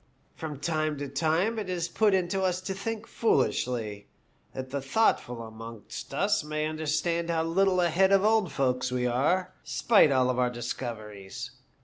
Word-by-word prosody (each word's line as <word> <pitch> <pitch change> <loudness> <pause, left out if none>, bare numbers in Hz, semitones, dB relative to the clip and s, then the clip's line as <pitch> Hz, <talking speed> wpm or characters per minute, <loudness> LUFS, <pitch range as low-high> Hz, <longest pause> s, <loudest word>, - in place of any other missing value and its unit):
From 150 -4 -6
time 155 -1 -1
to 145 0 -4
time 160 +11 +1
it 205 -3 -5
is 175 -2 -1
put 210 +1 +3
into 185 +1 0
us 185 -1 +1
to 190 +1 -3
think 220 +3 -4
foolishly, 120 - 0 0.4
that 130 0 -7
the 140 0 -2
thoughtful 135 - +1
amongst 115 -1 -9
us - - +1
may 155 0 -2
understand 160 +2 -1
how 165 -1 +1
little 185 +3 +2
ahead 180 +3 +3
of 195 0 +5
the - - +5
old 220 -6 +2
folks 125 -2 0
we 125 -1 0
are, 150 +10 +1
spite 210 -10 +4
of 130 -2 +3
all 125 0 0
our 125 -1 +3
discoveries. 120 -1 -6
155 Hz, 165 wpm, -28 LUFS, 125-185 Hz, 0.4 s, of